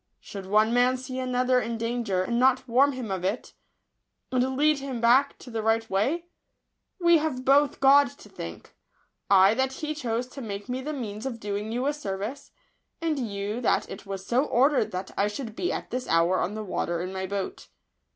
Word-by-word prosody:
Should 195 -2 -9
one 215 +3 +3
man 250 +1 +3
see 255 0 -6
another 255 0 +2
in 230 0 -3
danger, 230 -5 -1
and 235 +5 -1
not 260 +1 +3
warn 270 +4 +4
him 250 -5 -5
of 190 -2 -3
it, 195 +6 -2 0.8
and 260 +1 0
lead 300 0 +3
him 270 -3 -5
back 250 +5 +4
to 250 - -12
the 225 -1 -2
right 225 +1 +1
way? 270 - 0 0.7
We 340 -2 +5
have 275 -5 -3
both 280 +2 +4
God 275 +1 +6
to - - -14
thank: 85 - -9 0.6
I 195 +1 +6
that 265 +2 0
He 305 +2 -4
chose 245 -5 -2
to 275 - -9
make 205 -2 -6
me 255 +1 -3
the 300 +3 -4
means 225 -5 -5
of 235 -3 -5
doing 205 +1 -3
you 245 +3 -1
a 290 - +1
service, 215 0 -5 0.5
and 320 -3 -1
you 210 -1 -3
that 235 - +1
it 195 - -9
was 195 -1 -5
so 245 +5 +2
or 270 +3 +3
dered 235 -7 +1
that 185 -1 -5
I 200 - +2
should 220 +1 -6
be 355 - -1
at - - -5
this 250 +1 -3
hour 170 +3 +3
on 200 +4 -2
the 215 - -4
water 175 -3 -2
in 185 +1 -5
my 190 0 -3
boat." 195 0 -4
240 Hz, 205 wpm, -26 LUFS, 205-265 Hz, 0.8 s, God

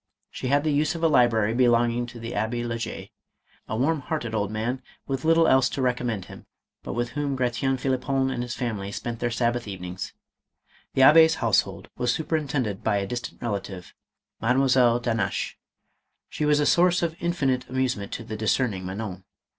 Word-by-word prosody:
She - - -5
had 140 +2 +3
the 155 - +1
use 150 +4 +1
of 165 - -5
a - - +6
library 115 -7 +3
belong 120 -1 +3
ing 120 +1 -2
to 120 -1 -10
the 115 +1 -6
Abbe* 110 +3 -1
le 115 -1 -3
Jay, - - -6 0.6
a 110 - -3
warm 150 +6 +1
hearted 130 -6 -3
old 105 -2 0
man 115 +5 -2 0.2
with 135 -1 -3
little 165 0 +4
else 130 0 +4
to 140 - -3
recommend 120 -6 -1
him, - - -13 0.3
but - - -6
with 120 0 -1
whom 145 0 -2
Gratien 130 +1 0
Phlippon 130 +1 0
and 120 - -3
his 120 0 -4
family 105 -6 -3
spent 115 +2 -5
their 120 - 0
Sabbath 120 0 -1
evenings. 90 -2 -6 0.8
The 135 - +3
Abbd's 160 +3 +7
household 115 -5 0
was 125 -1 +2
superintended 140 -9 -2
by 105 -2 +2
a 100 - -1
distant 120 +5 -6
relative, 100 -5 -5 0.5
Mademoiselle 125 -1 +3
d'Hannaches. 115 -2 -1 0.8
She 150 - -2
was 150 0 +3
a 145 - +2
source 175 +2 +4
of 165 -1 -1
infinite 135 -7 0
amusement 130 -6 -1
to 115 - -5
the 110 -1 -6
discerning 110 -2 0
Manon. 95 -1 -5
120 Hz, 180 wpm, -25 LUFS, 110-135 Hz, 0.8 s, Abbd's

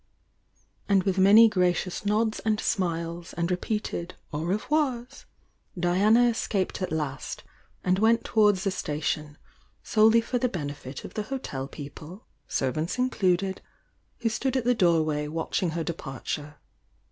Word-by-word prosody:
And 195 -2 +4
with 195 -1 0
many 210 +4 +8
gracious 180 -1 0
nods 215 +1 +1
and 220 -1 0
smiles 170 -4 -2
and 170 +1 -1
re 180 - +1
peated 185 -4 -3 0.2
o« 150 - -2
revoirs, 250 - -1 0.5
Diana 205 +7 +4
escaped 205 -5 -1
at 185 - -2
last, 150 -4 -4 0.4
and 185 +1 +2
went 225 +2 +3
towards 210 -4 +3
the 195 - +1
station, 150 -3 -3 0.5
solely 220 +1 +5
for 245 +2 -1
the 250 - +1
benefit 145 - -6
of - - -9
the 215 - -3
liotel 145 - -5
people, 155 +7 -10 0.2
servants 155 - -1
included, 190 -7 +1 0.6
who 230 - +2
stood 260 +4 -1
at 250 - -2
the 245 - +4
doorway 160 -7 +2
watching 165 +3 -1
her 165 - -1
departure. 150 -2 -5
185 Hz, 135 wpm, -27 LUFS, 160-220 Hz, 0.6 s, many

